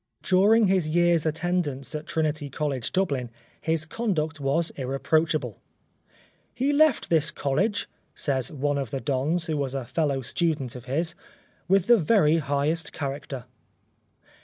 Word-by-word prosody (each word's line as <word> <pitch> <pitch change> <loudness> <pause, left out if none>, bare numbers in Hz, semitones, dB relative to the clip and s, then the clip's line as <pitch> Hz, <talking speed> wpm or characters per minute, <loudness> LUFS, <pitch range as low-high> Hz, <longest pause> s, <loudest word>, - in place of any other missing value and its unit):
During 205 +4 +5
his 185 -5 +2
year's 170 -1 +3
attendance 155 -4 -1
at 155 +1 -5
Trinity 155 -2 -1
College, 140 -4 -2
Dublin, 140 -10 0 0.3
his 160 0 0
conduct 160 -6 -2
was 145 +5 +1
irreproachable. 135 - -1 0.5
" - - -33
He 270 +4 +1
left 305 - +3
this 160 -1 +4
College," 190 +9 -1 0.3
says 130 -3 -1
one 145 -1 -1
of 135 -4 -3
the 135 - -3
Dons 150 +6 -1
who 155 -2 -2
was 140 -2 -2
a 135 -3 -3
fellow 140 -1 -1
student 150 -4 -1
of 125 -1 -9
his, 160 +6 0 0.3
" - - -36
with 195 -1 +3
the 240 +1 +6
very 165 -3 +4
highest 145 +2 -1
character." 140 -3 -5
155 Hz, 145 wpm, -26 LUFS, 140-175 Hz, 0.5 s, the